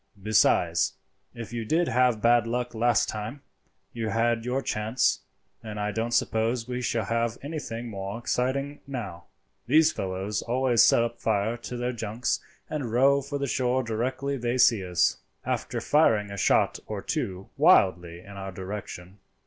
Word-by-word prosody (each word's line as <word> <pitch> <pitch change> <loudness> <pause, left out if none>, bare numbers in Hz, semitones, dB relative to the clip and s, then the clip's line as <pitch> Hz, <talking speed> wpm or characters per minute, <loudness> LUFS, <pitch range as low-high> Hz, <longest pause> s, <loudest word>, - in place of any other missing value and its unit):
Besides, 90 -4 +3 0.4
if 115 -1 -8
you 115 -1 -3
did 160 +9 +1
have 125 -2 +2
bad 120 -1 +4
luck 125 +1 -2
last 120 +1 +2
time, 110 +6 -5 0.5
you 115 -2 -3
had 115 +1 +1
your 130 +2 -1
chance, 110 +4 +1 0.4
and 105 -2 -7
I 105 0 -1
don't 115 +3 -2
suppose 115 0 0
we 125 0 -3
shall 115 -2 -1
have 115 0 -1
anything 140 -6 -5
more 100 -1 -5
exciting 130 +4 -1
now. 105 -11 -6 0.4
These 155 +5 +5
fellows 95 +2 -3
always 125 -1 +2
set 115 0 +3
fire 110 +1 +1
to 120 +1 -7
their 125 +1 -2
junks 110 +1 -2 0.3
and 140 -7 -4
row 135 +4 +4
for 140 +1 -4
the 140 - -2
shore 130 0 0
directly 130 +5 -2
they 120 0 -1
see 115 -5 +4
us, 90 -4 +1 0.3
after - - -2
firing 110 -9 +2
a - - -5
shot - - +2
or - - -5
two 95 0 -3
wildly 85 -2 +3
in 100 - -13
our 95 0 -6
direction." 95 0 -7
115 Hz, 155 wpm, -27 LUFS, 105-125 Hz, 0.5 s, These